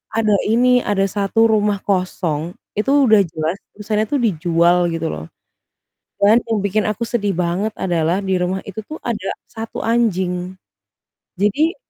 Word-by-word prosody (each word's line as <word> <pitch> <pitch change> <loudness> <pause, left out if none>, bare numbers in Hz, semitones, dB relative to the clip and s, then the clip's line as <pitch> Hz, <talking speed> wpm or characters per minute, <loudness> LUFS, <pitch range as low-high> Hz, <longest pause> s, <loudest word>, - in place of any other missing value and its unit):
ada 220 -1 +2 0.2
ini, 245 +3 +4
ada 205 -4 0
1 200 +2 0
rumah 210 -1 +2
kosong, 180 -4 -1 0.2
itu 210 - -1 0.2
udah 220 -2 +6
jelas 160 +3 -2 0.2
tulisannya 215 +1 -1
tuh 290 - +2
dijual 170 -3 +2 0.2
gitu 165 0 -2
loh. 80 - -7 0.9
Dan 210 +3 +6
yang 225 -1 0
bikin 200 +2 0
aku 215 +2 -2
sedih 225 -4 -1
banget 180 +5 -1
adalah 175 +1 0
di 190 -1 0
rumah 180 +2 -1
itu 200 +1 -8
tuh 310 - -7
ada 215 -5 -3 0.2
1 225 0 -6
anjing. 185 -6 0 0.8
Jadi 280 - +1
200 Hz, 145 wpm, -19 LUFS, 180-220 Hz, 0.9 s, udah